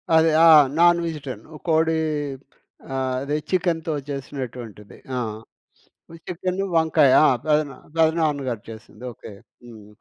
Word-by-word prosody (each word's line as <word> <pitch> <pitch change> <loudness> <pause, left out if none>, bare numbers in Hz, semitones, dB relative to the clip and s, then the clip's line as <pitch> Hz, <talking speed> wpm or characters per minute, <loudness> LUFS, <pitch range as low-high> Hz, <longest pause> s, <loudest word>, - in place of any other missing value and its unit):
అదే. 160 0 +5 0.2
ఆ! - - +8 0.3
Non 175 0 +5
vegetarian. 140 -9 -6 0.2
కోడి 160 0 +2 1.0
ఆహ్, 130 -1 -1
అదే 145 +2 -2
చికెనుతో 170 -3 -1 0.2
చేసినటువంటిది. 125 -6 -7 0.2
ఆ‌! - - 0 1.1
చికెను, 185 +2 -3
వంకాయ 155 -4 +4
ఆ! - - +5 0.2
పెదనా 150 -3 +1 0.2
పెదనాన్నగారు 150 -8 0
చేసింది, 110 0 -13
ఓకే. 110 - -12 0.3
హ్మ్. 110 -4 -14
150 Hz, 110 wpm, -22 LUFS, 125-165 Hz, 1.1 s, ఆ